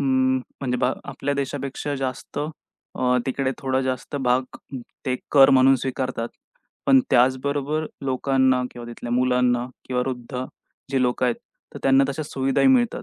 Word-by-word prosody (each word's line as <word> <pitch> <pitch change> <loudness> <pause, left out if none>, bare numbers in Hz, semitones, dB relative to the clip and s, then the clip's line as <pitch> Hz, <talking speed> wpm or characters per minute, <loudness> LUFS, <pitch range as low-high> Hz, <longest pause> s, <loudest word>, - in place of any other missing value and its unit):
अं, 130 -1 +2 0.2
म्हणजे 125 -2 -1
ब - - +1 0.2
आपल्या 140 +1 -3
देशापेक्षा 140 +1 -3
जास्त 130 0 -4 0.6
अ, 125 0 +2
तिकडे 130 0 0
थोडा 130 -1 0
जास्त 130 +2 -3
भाग 130 -1 +2 0.6
ते 130 -1 +1 0.2
कर 135 -2 +8
म्हणून 135 0 +6
स्वीकारतात, 130 -3 -3 0.6
पण 270 -1 +7
त्याचबरोबर 140 +4 +2 0.2
लोकांना 130 -1 +2
किंवा 120 -1 -9
तिथल्या 120 0 -6
मुलांना 125 -1 +2 0.2
किंवा 125 -1 0
वृद्ध 125 0 -4 0.5
जी 135 -2 +2
लोक 125 0 0
आहेत, 120 -2 +2 0.4
तर - - -6
त्यांना 135 0 +5
तशा 140 +3 -3
सुविधाही 135 - +1
मिळतात. 245 -3 +3
130 Hz, 145 wpm, -23 LUFS, 125-135 Hz, 0.6 s, कर